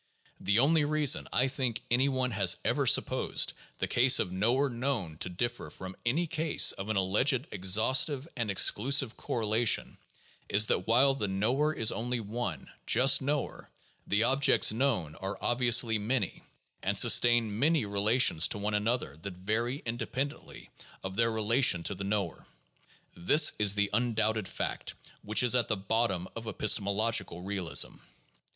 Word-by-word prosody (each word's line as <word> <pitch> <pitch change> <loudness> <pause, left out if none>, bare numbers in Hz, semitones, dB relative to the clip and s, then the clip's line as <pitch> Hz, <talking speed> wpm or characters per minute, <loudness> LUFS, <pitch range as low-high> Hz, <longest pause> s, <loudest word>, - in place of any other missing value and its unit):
The 100 +2 0
only 150 +5 +3
reason, 150 -1 +1
I 130 - +2
think, 130 -3 -3
any 130 +3 +2
one 130 -1 -2
has 100 -4 +2
ever - - 0
supposed - - +2 0.2
the - - -2
case 130 +2 +4
of 90 - -1
knower 120 +9 0
known 120 - -3
to - - -4
differ 120 +7 -4
from 95 0 -10
any 145 +9 0
case 160 -1 +2
of 95 +2 -8
an 110 - -1
alleged 120 +8 0
exhaustive 120 - +1
and 120 -4 -3
exclusive 130 +5 +2
correlation 110 0 -1 0.5
is 105 +2 +3
that - - -1
while 130 +4 +3
the 120 -6 -3
knower 120 +11 0
is 110 -7 +1
only 120 +1 -3
one 105 - -6
— - - -39
just 135 +2 +4
knower 145 +1 -4 0.2
— - - -38
the 105 +2 +1
objects 135 -3 +3
known 110 - -1
are 95 +1 -6
obviously 120 -2 +2
many 110 -1 -3 0.4
and - - -2
sustain 115 -3 +4
many 150 -2 +1
relations 100 -3 +2
to - - -4
one 105 +1 -4
another 105 - -2
that 90 +3 -9
vary 115 +8 -3
independently 120 +4 -6 0.3
of 95 0 -6
their 115 +2 +1
relation 110 -4 +1
to 100 - -2
the 100 0 -7
knower. 100 -3 -4 0.7
This 145 - +4
is 105 -1 +3
the 100 -1 -1
undoubted 110 -3 -1
fact - - -5 0.3
which 110 +3 0
is 125 - +4
at 125 -2 +1
the 110 - -1
bottom 95 -2 -2
of 115 0 -8
epistemological 105 -3 0
realism. 95 -3 -1
115 Hz, 155 wpm, -29 LUFS, 100-130 Hz, 0.7 s, case